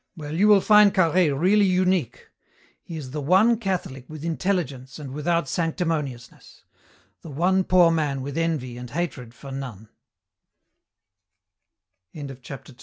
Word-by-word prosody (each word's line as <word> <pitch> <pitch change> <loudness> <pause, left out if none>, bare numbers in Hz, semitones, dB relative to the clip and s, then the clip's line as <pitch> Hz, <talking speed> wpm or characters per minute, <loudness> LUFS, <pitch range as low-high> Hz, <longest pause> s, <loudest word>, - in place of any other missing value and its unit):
Well, 150 -1 -7
you 195 +6 +3
will 205 -2 +6
find 210 -1 +5
Carhaix 175 -3 +3
really 190 +8 +3
unique. 185 -6 0 0.5
He 165 - -8
is 135 -4 -8
the 150 +1 -4
one 195 +10 +3
Catholic 185 - -3
with 155 0 -8
intelligence 160 -7 -2
and 145 -4 -8
without 165 +1 -1
sanctimoniousness; 155 -7 -4 0.6
the 165 - -10
one 180 +6 +1
poor 180 -2 +4
man 145 -5 -1
with 140 +1 -6
envy 155 -7 -2
and 125 0 -8
hatred 130 -5 -5
for 135 +3 -11
165 Hz, 120 wpm, -24 LUFS, 140-185 Hz, 0.6 s, will